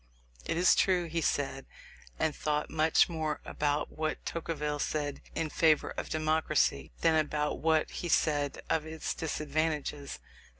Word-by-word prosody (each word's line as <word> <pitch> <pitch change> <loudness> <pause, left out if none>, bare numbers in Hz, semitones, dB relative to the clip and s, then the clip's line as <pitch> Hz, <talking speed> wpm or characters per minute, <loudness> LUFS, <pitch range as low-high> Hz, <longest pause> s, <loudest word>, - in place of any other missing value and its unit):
It - - -1
is 180 +1 +6
true, 180 -2 +3
he 165 0 -2
said 135 -3 -1 0.5
and 155 - 0
thought 150 0 -1
much 160 0 +4
more 160 -3 -2
about 145 0 -1
what 155 0 -3
Tocqueville 150 -3 -3
said 145 -1 -2
in 160 -2 -1
favour 155 -2 +3
of - - -5
democracy, 155 -1 +1
than 165 -1 +4
about 150 -1 -1
what 160 +1 +2
he 175 - -4
said 145 -3 +1
of 160 -1 0
its 160 0 -3
disadvantages. 150 -2 -2
155 Hz, 140 wpm, -31 LUFS, 150-160 Hz, 0.5 s, is